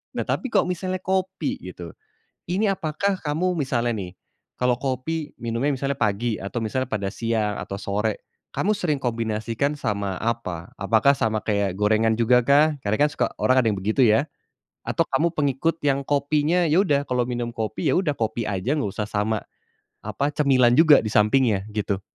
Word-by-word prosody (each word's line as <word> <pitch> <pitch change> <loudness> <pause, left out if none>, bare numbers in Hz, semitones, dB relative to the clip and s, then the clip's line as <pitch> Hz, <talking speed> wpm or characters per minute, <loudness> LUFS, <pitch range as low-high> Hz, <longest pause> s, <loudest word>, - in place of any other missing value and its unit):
Nah, - - -3
tapi 260 -4 -2
kok - - +4
misalnya 185 +1 -3
kopi 190 -3 -1
gitu, 90 -3 -9 0.6
ini 190 +5 +1
apakah 195 0 0
kamu 165 +5 0
misalnya 120 -3 0
nih, 95 -5 -5 0.5
kalau 125 0 +2
kopi 145 +4 -3
minumnya 115 +4 -1
misalnya 140 +1 -1
pagi, 105 +2 0
atau 100 +5 -5
misalnya 130 +3 -2
pada 100 -3 -2
siang, 110 -3 -1
atau 100 - -5
sore, 105 +2 -2 0.2
kamu 210 - 0
sering 180 -8 -1
kombinasikan 115 +3 -2
sama 100 -7 -2
apa, 100 -7 -4
apakah 110 +7 +4
sama 110 -5 -1
kayak 100 -3 0
gorengan 110 +2 +2
jugakah? 125 +6 +4
Karena 105 -1 0
kan - - 0
suka - - 0
orang 130 0 +3
ada 115 - 0
yang 105 - -1
begitu 110 +7 0
ya, 115 +2 +4 0.6
atau - - +1
kamu 165 +5 0
pengikut 150 +3 0
yang 140 -1 0
kopinya 150 +4 +1
ya 160 - +4
udah, 145 -8 +3
kalau 125 -1 +1
minum 120 -1 -3
kopi 110 -2 -2
ya - - +3
udah, 160 -6 0
kopi 110 -2 -2
aja 105 +9 -1
enggak 105 -8 -2
usah 105 - -5
sama 105 +1 -1 0.6
apa, 145 +1 -2
cemilan 130 -5 +4
juga 155 0 +7
di 110 -1 -3
sampingnya, 105 -1 +3
gitu. 100 -2 -2
120 Hz, 170 wpm, -23 LUFS, 110-150 Hz, 0.6 s, juga